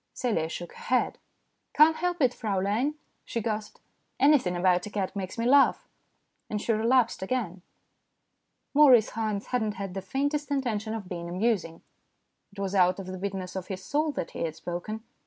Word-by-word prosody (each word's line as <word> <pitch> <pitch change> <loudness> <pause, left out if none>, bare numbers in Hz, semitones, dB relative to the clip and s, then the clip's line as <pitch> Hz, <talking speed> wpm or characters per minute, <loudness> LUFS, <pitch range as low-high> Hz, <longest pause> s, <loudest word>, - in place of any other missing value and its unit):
Celia 185 -11 0
shook 175 +1 -7
her - - -12
head. 250 0 +1 0.3
" - - -49
Can't 315 +2 +6
help 350 -3 0
it, 250 -1 +3
Fraulein," 215 +7 -1 0.3
she 230 - -3
gasped. 215 -1 -4 0.2
" - - -47
Anything 270 -10 +4
about 180 +1 +2
a - - -6
cat 200 -1 -3
makes 190 +1 -5
me 230 - -1
laugh." 275 +3 +4 0.6
And 210 - -2
she 225 - 0
relapsed 230 0 +2
again. 190 -4 -2 1.1
Maurice 265 -7 +6
Haynes 215 -2 -2
had 250 - +2
not 215 -1 -2
had 195 -2 -5
the 195 - -4
faintest 285 +9 -1
intention 225 -6 -1
of 210 -4 -6
being 170 -1 -5
amusing. 185 -3 -1 0.7
It 200 - -20
was 195 -1 -3
out 185 -1 +4
of 195 - -6
the 185 0 -6
bitterness 190 -1 -4
of 185 -1 -4
his 190 -1 -6
soul 300 +1 0
that - - -4
he - - -8
had 160 -2 -2
spoken. 185 +7 -5
210 Hz, 185 wpm, -28 LUFS, 185-250 Hz, 1.1 s, Can't